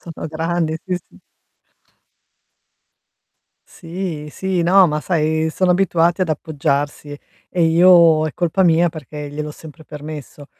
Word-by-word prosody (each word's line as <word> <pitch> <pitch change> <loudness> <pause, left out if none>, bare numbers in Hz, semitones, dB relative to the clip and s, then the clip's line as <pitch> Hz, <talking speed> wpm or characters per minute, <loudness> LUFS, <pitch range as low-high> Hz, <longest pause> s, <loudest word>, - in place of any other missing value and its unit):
Sono 165 -1 -8
grandi, 160 0 -2
sì, 185 - -2
sì. - - -21 2.5
Sì, 165 -3 -6
sì, 185 +1 -2
no, 185 +2 +5
ma 150 -2 -2
sai 160 -1 0
sono 180 +2 +1
abituati 175 -1 +1
ad 180 - +1
appoggiarsi, 145 -1 -3 0.3
e 175 -2 -1
io 165 -1 +5
è 155 - -3
colpa 175 +2 0
mia 170 0 +4
perché 150 -1 -8
gliel'ho 150 +1 -5
sempre 155 +1 -13
permesso. 150 -1 -9
160 Hz, 125 wpm, -19 LUFS, 150-175 Hz, 2.5 s, no